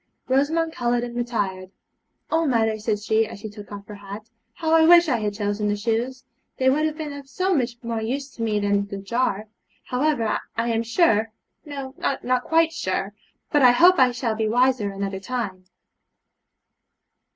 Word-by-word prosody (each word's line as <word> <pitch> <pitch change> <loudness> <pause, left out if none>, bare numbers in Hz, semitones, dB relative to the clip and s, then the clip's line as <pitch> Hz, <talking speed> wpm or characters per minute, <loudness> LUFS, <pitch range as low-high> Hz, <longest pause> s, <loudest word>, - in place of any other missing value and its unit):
Rosamond 320 +5 +1
coloured 240 0 0
and 240 0 -6
retired. 200 -6 -2 0.6
'Oh, 325 0 +2
mother,' 225 -4 +1
said 215 0 0
she, 220 +1 +1
as 205 - -9
she 215 0 -7
took 205 -1 -11
off 200 0 -8
her 210 - -10
hat, 205 +2 -9 0.3
'how 320 -2 -1
I 320 0 +6
wish 345 0 +8
that 265 -7 +1
I - - -4
had 210 -1 -2
chosen 205 0 -1
the 205 - +1
shoes! 235 +5 -2 0.3
They 260 0 +3
would 305 +3 +2
have 310 0 -5
been 305 -3 -5
of 280 -1 -10
so 375 +5 0
much 245 -6 0
more 230 -1 -3
use 270 +5 -3
to - - -10
me 215 -2 +1
than 200 0 +1
that 200 -1 -7
jar. 215 -1 -1 0.4
However, 250 -4 0 0.2
I 230 +1 0
am 225 -1 +1
sure 225 - +2 0.3
no, 275 -3 -6
not 255 -2 0
quite 325 0 +2
sure, 195 - -2 0.4
but 295 - +3
I 250 -2 +7
hope 355 +6 +6
I 255 -1 +6
shall 240 -2 -2
be 220 0 -1
wiser 245 -3 +2
another 195 -1 -4
time.' 195 -5 -4
235 Hz, 185 wpm, -23 LUFS, 210-275 Hz, 0.6 s, wish